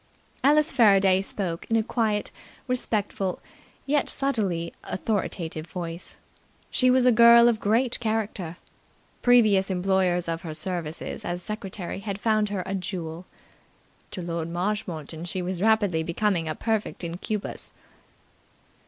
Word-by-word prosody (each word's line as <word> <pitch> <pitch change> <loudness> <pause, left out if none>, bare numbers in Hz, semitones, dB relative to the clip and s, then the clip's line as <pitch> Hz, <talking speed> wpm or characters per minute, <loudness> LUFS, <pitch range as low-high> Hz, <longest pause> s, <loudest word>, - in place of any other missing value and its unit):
Alice 300 +3 +4
Faraday 195 -4 +5
spoke 185 -4 -3
in 225 - +2
a 225 - +3
quiet, 215 -3 -1 0.4
respectful, 210 -6 -1 0.5
yet 285 0 +1
subtly 195 -11 -1
authoritative 175 -6 -3
voice. 170 -1 -6 0.5
She 255 - +3
was 255 0 +4
a 250 - +7
girl 235 0 +8
of 230 -2 +2
great 230 +4 +1
character. 215 -7 -2 0.6
Previous 215 -6 +5
employers 185 -1 +1
of 165 0 -2
her 160 -2 -6
services 170 -2 -4
as 175 0 -3
secretary 195 -4 -5
had 200 -1 -5
found 215 -1 +2
her 195 -3 -2
a 195 - -4
jewel. 180 -3 -5 0.8
To 185 - -6
Lord 170 -1 -3
Marshmoreton 175 -4 -3
she 180 +1 -3
was 180 0 -3
rapidly 205 -6 +3
becoming 170 0 0
a 155 - -2
perfect 220 -4 -2
incubus. 180 +5 -3
195 Hz, 125 wpm, -26 LUFS, 175-220 Hz, 0.8 s, girl